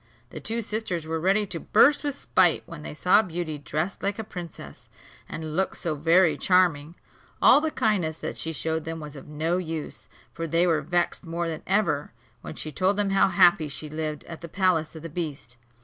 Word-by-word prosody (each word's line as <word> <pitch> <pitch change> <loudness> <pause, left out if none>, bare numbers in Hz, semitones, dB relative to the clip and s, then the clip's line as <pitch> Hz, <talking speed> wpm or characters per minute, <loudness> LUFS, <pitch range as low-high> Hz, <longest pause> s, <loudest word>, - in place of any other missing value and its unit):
The - - -7
two 230 +1 -2
sisters 210 -7 -3
were 160 0 -2
ready 195 +5 +2
to 180 -4 -5
burst 290 - +4
with 290 -2 -2
spite 180 - +2
when 165 -2 -9
they 150 - -7
saw 185 +6 +5
Beauty 170 -5 -4
dressed 155 +6 -3
like 200 0 -1
a 220 - -4
princess, 170 - -10 0.4
and 155 -1 -5
look 190 +2 0
so 170 -3 -2
very 165 +1 +3
charming. 170 -4 +2 0.4
All 290 - +7
the 315 - 0
kindness 185 - 0
that - - -5
she 160 - -2
showed 160 +1 -2
them 165 +1 -5
was 150 -1 -9
of 140 - -11
no 160 +4 -1
use; 160 -3 -6 0.2
for 165 0 -4
they 165 +3 +2
were 165 -3 +2
vexed 175 +4 -1
more 170 0 -3
than 160 -1 -4
ever, 190 - 0 0.3
when - - -8
she 155 - -5
told 185 +8 +1
them 205 -1 +1
how 195 0 +4
happy 175 -5 +4
she 150 +1 -5
lived 155 -1 -4
at 165 -1 -10
the 170 - -8
palace 175 -4 +1
of 160 - -9
the - - -4
beast. 150 -7 -5
165 Hz, 205 wpm, -26 LUFS, 155-190 Hz, 0.4 s, All